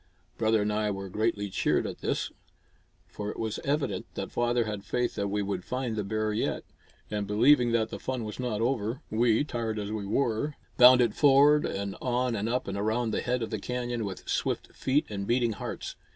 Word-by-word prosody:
Brother 110 Hz, -1 st, +2 dB
and 105 Hz, 0 st, 0 dB
I 105 Hz, 0 st, 0 dB
were 100 Hz, -1 st, -4 dB
greatly 105 Hz, 0 st, -1 dB
cheered -, -, +1 dB
at -, -, -5 dB
this; -, -, -2 dB, 0.7 s
for 105 Hz, 0 st, -6 dB
it -, -, -6 dB
was 110 Hz, -1 st, -3 dB
evident 135 Hz, -10 st, -1 dB
that -, -, -4 dB
father 120 Hz, 0 st, +1 dB
had 105 Hz, -2 st, -4 dB
faith 125 Hz, +2 st, -1 dB
that 100 Hz, -, -2 dB
we 100 Hz, +1 st, -1 dB
would 95 Hz, -2 st, -3 dB
find 125 Hz, -1 st, -3 dB
the 105 Hz, -, -1 dB
bear 110 Hz, +1 st, -1 dB
yet. 105 Hz, -, -1 dB, 0.5 s
And 105 Hz, -1 st, -2 dB
believing 120 Hz, +3 st, +4 dB
that 110 Hz, -1 st, +2 dB
the -, -, -5 dB
fun 130 Hz, -3 st, -3 dB
was 105 Hz, +2 st, -6 dB
not 120 Hz, -4 st, -2 dB
over, 120 Hz, +2 st, -1 dB
we, 115 Hz, +3 st, +3 dB
tired 115 Hz, -6 st, -3 dB
as 105 Hz, 0 st, -3 dB
we 105 Hz, -2 st, -3 dB
were, 125 Hz, +5 st, 0 dB, 0.2 s
bounded 125 Hz, -2 st, +7 dB
forward 145 Hz, +1 st, +5 dB
and 100 Hz, 0 st, -3 dB
on 125 Hz, -1 st, 0 dB
and 105 Hz, +1 st, -1 dB
up 125 Hz, +2 st, -1 dB
and 100 Hz, 0 st, -3 dB
around 110 Hz, +2 st, 0 dB
the -, -, -1 dB
head 125 Hz, -1 st, -1 dB
of 115 Hz, -, -5 dB
the 110 Hz, -, -2 dB
canyon 120 Hz, +1 st, -3 dB
with 95 Hz, -3 st, -6 dB
swift -, -, -2 dB
feet 140 Hz, +3 st, +1 dB
and 100 Hz, -2 st, -5 dB
beating 120 Hz, -1 st, +2 dB
hearts. -, -, -6 dB
110 Hz, 205 wpm, -28 LUFS, 105-125 Hz, 0.7 s, bounded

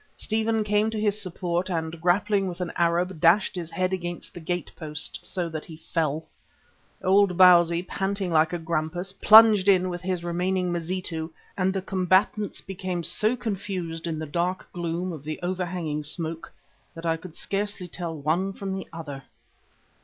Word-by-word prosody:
Stephen 220 Hz, 0 st, 0 dB
came 210 Hz, +1 st, +2 dB
to 220 Hz, -1 st, -3 dB
his 210 Hz, 0 st, +1 dB
support 180 Hz, -1 st, -2 dB
and 165 Hz, -1 st, -3 dB
grappling 195 Hz, +3 st, +2 dB
with 180 Hz, 0 st, -6 dB
an 180 Hz, -2 st, -3 dB
Arab, 175 Hz, +1 st, +1 dB
dashed 180 Hz, +4 st, +4 dB
his 170 Hz, -3 st, -4 dB
head 185 Hz, +1 st, -1 dB
against 175 Hz, -2 st, -4 dB
the -, -, -8 dB
gate 175 Hz, +2 st, -3 dB
post 150 Hz, -3 st, -4 dB
so 180 Hz, -2 st, -2 dB
that 160 Hz, -2 st, -5 dB
he 160 Hz, -, -10 dB
fell. 160 Hz, -1 st, -2 dB, 0.8 s
Old 190 Hz, -1 st, +4 dB
Bausi, 175 Hz, -2 st, +6 dB
panting 195 Hz, 0 st, -2 dB
like 160 Hz, 0 st, +3 dB
a 175 Hz, -, -1 dB
grampus, 170 Hz, +3 st, -2 dB
plunged 215 Hz, -1 st, +7 dB
in 185 Hz, -2 st, +4 dB
with 175 Hz, -1 st, -5 dB
his 180 Hz, -1 st, -2 dB
remaining 180 Hz, +1 st, 0 dB
Mazitu 170 Hz, -1 st, -2 dB, 0.3 s
and 190 Hz, 0 st, +1 dB
the 190 Hz, -1 st, -3 dB
combatants 190 Hz, +2 st, +1 dB
became 185 Hz, -2 st, -4 dB
so 215 Hz, +7 st, +2 dB
confused 190 Hz, -8 st, -4 dB
in 160 Hz, -2 st, -2 dB
the 155 Hz, -, -4 dB
dark 175 Hz, +5 st, -2 dB
gloom 175 Hz, +1 st, -3 dB
of 150 Hz, -4 st, -8 dB
the 155 Hz, +1 st, -5 dB
overhanging 175 Hz, -4 st, -2 dB
smoke 160 Hz, +2 st, -4 dB, 0.4 s
that 165 Hz, +1 st, -8 dB
I 165 Hz, -1 st, +2 dB
could 165 Hz, 0 st, -11 dB
scarcely 200 Hz, -2 st, -1 dB
tell 170 Hz, -2 st, -5 dB
one 170 Hz, +7 st, 0 dB
from 195 Hz, 0 st, -5 dB
the 190 Hz, 0 st, -5 dB
other. 145 Hz, -5 st, -7 dB
180 Hz, 170 wpm, -26 LUFS, 165-190 Hz, 0.8 s, plunged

